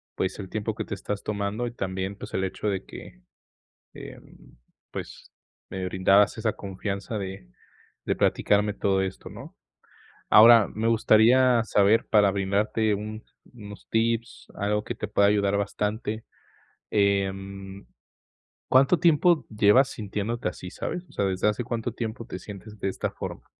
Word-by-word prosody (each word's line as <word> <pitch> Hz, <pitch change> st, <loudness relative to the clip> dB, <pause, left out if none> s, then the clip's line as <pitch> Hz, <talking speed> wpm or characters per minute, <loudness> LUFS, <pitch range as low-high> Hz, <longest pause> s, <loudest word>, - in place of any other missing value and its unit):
pues 95 Hz, +2 st, -2 dB
el 95 Hz, -2 st, -7 dB
tiempo 110 Hz, 0 st, -3 dB
que 110 Hz, 0 st, -5 dB
te 100 Hz, -, -5 dB
estás 100 Hz, +1 st, -5 dB
tomando 105 Hz, +3 st, -2 dB
y -, -, -5 dB
también 95 Hz, -2 st, -4 dB
pues -, -, -10 dB
el 95 Hz, -, -1 dB
hecho 95 Hz, +2 st, -3 dB
de 95 Hz, -2 st, -1 dB
que, -, -, -12 dB, 0.7 s
em, -, -, -13 dB, 0.3 s
pues, -, -, -8 dB, 0.4 s
me 95 Hz, -1 st, -5 dB
brindabas 95 Hz, +4 st, +3 dB
esa 110 Hz, -1 st, -1 dB
confianza 100 Hz, +2 st, -5 dB
de 95 Hz, -9 st, -7 dB, 0.6 s
de -, -, 0 dB
platicarme 105 Hz, 0 st, +2 dB
todo 95 Hz, -2 st, +1 dB
esto, 95 Hz, 0 st, -6 dB
¿no? -, -, -11 dB, 0.7 s
Ahora 115 Hz, -1 st, +8 dB
me 110 Hz, +2 st, -2 dB
gustaría 115 Hz, +2 st, +4 dB
saber 105 Hz, 0 st, +3 dB
para 105 Hz, -2 st, +4 dB
brindarte 100 Hz, +2 st, 0 dB
un 110 Hz, +2 st, -6 dB, 0.3 s
unos 105 Hz, -4 st, -12 dB
tips, 115 Hz, 0 st, -1 dB
algo 105 Hz, +1 st, -1 dB
que -, -, -4 dB
te 105 Hz, -, -5 dB
pueda 100 Hz, -1 st, +3 dB
ayudar 100 Hz, -1 st, +2 dB
bastante, 105 Hz, +2 st, -3 dB, 0.7 s
em, 100 Hz, -1 st, -1 dB, 0.8 s
¿cuánto 135 Hz, +6 st, +4 dB
tiempo 170 Hz, +1 st, +3 dB
llevas 110 Hz, +5 st, +4 dB
sintiéndote 105 Hz, 0 st, -3 dB
así, 90 Hz, 0 st, -8 dB
sabes? 180 Hz, 0 st, -5 dB
O -, -, -20 dB
sea, 100 Hz, -, -1 dB
¿desde 95 Hz, +1 st, -1 dB
hace 105 Hz, +3 st, -1 dB
cuánto 120 Hz, 0 st, -3 dB
tiempo 115 Hz, 0 st, -5 dB
te 95 Hz, -, -6 dB
sientes 105 Hz, +2 st, -11 dB
de 95 Hz, -, -1 dB
esta -, -, -3 dB
forma? -, -, -7 dB
105 Hz, 150 wpm, -26 LUFS, 100-115 Hz, 0.8 s, Ahora